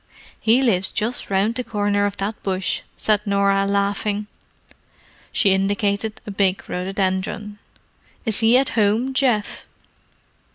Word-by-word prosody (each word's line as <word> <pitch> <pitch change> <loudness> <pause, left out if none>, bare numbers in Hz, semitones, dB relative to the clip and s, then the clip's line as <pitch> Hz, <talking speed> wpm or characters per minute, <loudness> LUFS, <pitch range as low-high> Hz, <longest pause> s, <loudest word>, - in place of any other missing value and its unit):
"He 235 +4 +3
lives 190 -6 +2
just 225 +3 -2
round 200 +3 +1
the 250 +1 -3
corner 205 -2 0
of 200 - -6
that 205 +2 -4
bush," 190 -1 -1 0.2
said 210 -2 +2
Norah, 200 -1 +2
laughing. 200 +1 0 1.1
She 195 -4 +3
indicated 200 +2 -1
a 210 - -5
big 195 -1 0
rhododendron. 190 +2 -2 0.7
"Is 220 -3 +1
he 230 +2 +5
at 270 0 +2
home, 225 +4 +1
Geoff?" 245 -6 0
205 Hz, 125 wpm, -21 LUFS, 195-220 Hz, 1.1 s, he